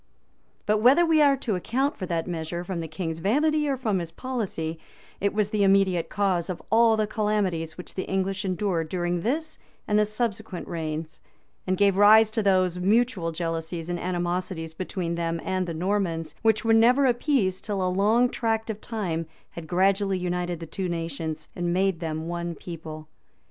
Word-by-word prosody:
But 210 0 +2
whether 265 +10 +6
we 320 -2 +4
are 280 -2 +5
to 240 -4 -2
account 260 - 0
for 185 - -5
that 165 -1 -1
measure 170 0 -4
from 180 -1 -4
the 165 - -4
king's 160 0 -4
vanity 295 - +2
or 270 - 0
from 215 -7 0
his 170 -1 -5
policy, 180 -8 -4 0.4
it 200 +1 +1
was 210 -1 0
the 210 - 0
immediate 195 -3 +3
cause 190 -3 0
of 180 - -3
all 225 0 +5
the 215 - +2
calamities 205 -7 -1
which 180 - -10
the 185 - -4
English 195 +1 -1
endured 185 -4 -1
during 175 -1 -1
this 310 - -2 0.3
and 210 0 +3
the 210 - +3
subsequent 215 -3 -3
reigns, 160 -2 -5 0.5
and 185 0 +1
gave 200 -1 +3
rise 215 +2 +7
to 220 - 0
those 185 -3 +2
mutual 205 -2 +2
jealousies 165 0 -4
and 175 0 -2
animosities 175 -2 -2
between 175 0 -3
them 170 0 -2
and 185 -1 -1
the 170 - -3
Normans, 170 -3 -1
which 220 -1 +2
were 225 - +4
never 245 +5 +5
appeased 240 -7 +1
till 200 -3 -1
a 180 0 0
long 220 +5 +4
tract 225 -2 -1
of 215 0 -8
time 175 -8 -3 0.2
had 170 -2 -8
gradually 195 +2 +2
united 180 -1 -2
the 165 - -6
two 185 +3 -4
nations, 160 -2 -4
and 175 -1 -1
made 190 -1 +1
them 160 -1 -4
one 170 0 -3
people. 155 -3 -8
185 Hz, 180 wpm, -26 LUFS, 170-215 Hz, 0.5 s, rise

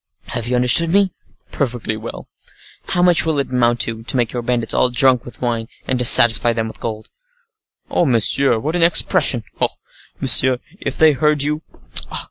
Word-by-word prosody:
"Have 120 -1 -5
you 125 - -1
understood 125 +7 +4
me?" 195 -1 +1 0.4
"Perfectly 120 -5 -4
well." 110 +2 -10 0.6
"How 175 - -1
much 175 -1 +3
will 160 -2 -2
it 140 -2 -3
amount 120 -2 0
to, 115 -1 -1
to 120 +3 -4
make 120 -2 -2
your 120 - -4
bandits 120 -1 -2
all 125 - +2
drunk 125 -1 +1
with 120 +1 -12
wine, 115 -2 -3 0.2
and 130 -1 -2
to 125 - -2
satisfy 115 0 +6
them 115 -1 -3
with 110 - -12
gold?" 110 -1 -7 0.8
"Oh, 170 - 0
monsieur, 125 +1 +2
what 150 +9 -4
an 175 - -1
expression! 155 -7 +2 0.2
Oh! - - +2 0.5
monsieur, 130 0 +4 0.2
if - - -6
they 160 -1 +4
heard 150 +1 0
you! 150 +1 -3
125 Hz, 180 wpm, -17 LUFS, 115-145 Hz, 0.8 s, satisfy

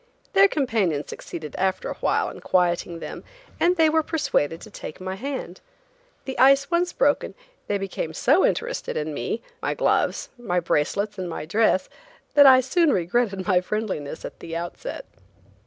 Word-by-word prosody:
Their 395 0 +7
companions 220 - 0
succeeded 155 -4 -7
after 190 0 0
awhile - - 0
in - - -11
quieting 175 -1 +1
them - - -7 0.4
and 355 +2 +3
they 320 -1 +5
were 320 +1 +3
persuaded 280 - -1
to 215 - -12
take 155 - -8
my 185 0 -4
hand. 240 -4 -5 0.6
The 265 - -5
ice 275 +3 +5
once 350 +1 +2
broken, - - +1 0.3
they 205 - 0
became 195 -4 -4
so 290 - +3
interested - - -1
in 155 0 -3
me, 145 - -3 0.2
my - - -1
gloves, - - +1
my 180 -7 0
bracelets 190 +6 -1
and 180 -1 -3
my 160 - -5
dress, 195 +2 +2 0.5
that 285 -1 +8
I 260 -1 +8
soon 305 +5 +2
regretted 195 +1 0
my 185 -3 +3
friendliness 185 -8 -4
in - - -5
the 165 -1 -7
outset. 175 - -5
205 Hz, 160 wpm, -24 LUFS, 175-280 Hz, 0.6 s, that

